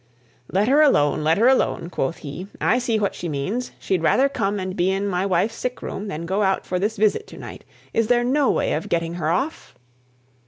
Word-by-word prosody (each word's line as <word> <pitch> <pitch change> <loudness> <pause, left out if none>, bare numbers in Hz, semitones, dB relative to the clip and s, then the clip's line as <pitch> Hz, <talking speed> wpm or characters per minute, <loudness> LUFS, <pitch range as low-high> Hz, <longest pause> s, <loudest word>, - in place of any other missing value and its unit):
"Let 200 +3 +2
her 285 +4 +5
alone! 150 - +3
let 160 +2 +3
her 230 +4 +4
alone!" 255 -9 +1
quoth 135 +1 -2
he. 160 +7 -6
"I 245 - +2
see 235 -3 0
what 205 -2 0
she 175 - -5
means. 190 - -3
She'd 185 -3 -1
rather 260 - +3
come 205 -6 -1
and 185 0 -4
be 180 0 +1
in 195 +1 0
my 185 0 0
wife's 205 +4 +1
sick 250 +2 -4
room 205 - -5
than 165 -3 -5
go 190 +4 0
out 190 -1 +1
for 180 - -2
this 215 +3 -1
visit 215 0 +1
to - - -12
night. - - -9 0.3
Is 225 -1 +1
there 240 0 +3
no 270 +3 +2
way - - +1
of 155 - -3
getting 165 0 -1
her 160 -3 -2
off?" 270 - -2
195 Hz, 225 wpm, -22 LUFS, 175-240 Hz, 0.3 s, her